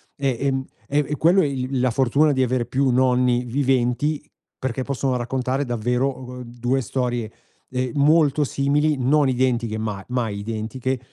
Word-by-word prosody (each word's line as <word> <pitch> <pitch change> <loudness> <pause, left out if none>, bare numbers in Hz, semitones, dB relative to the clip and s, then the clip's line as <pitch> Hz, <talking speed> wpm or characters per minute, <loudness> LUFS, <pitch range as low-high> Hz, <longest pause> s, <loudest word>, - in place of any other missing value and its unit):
E 135 -4 -1
ehm, 135 -1 0 0.2
e 145 +1 +1
e 150 - -2
quello 175 +4 +4
è - - +2
il 135 -1 -2
la 125 0 +2
fortuna 135 +5 +3
di 130 - +1
avere 125 -1 0
più 130 +2 +1
nonni 125 -1 +3
viventi 135 +3 0 0.4
perché 130 0 -2
possono 135 -1 -1
raccontare 130 +3 -1
davvero, 125 +3 0
uhm, 125 0 -8
2 120 +2 -1
storie, 120 -3 -2 0.4
ehm, 125 -1 -2
molto 150 0 +4
simili, 145 +2 +1
non 140 +3 +3
identiche, 120 -3 0
ma 105 -3 -4
mai 115 -5 -1
identiche 115 +5 -3
130 Hz, 155 wpm, -22 LUFS, 120-140 Hz, 0.4 s, quello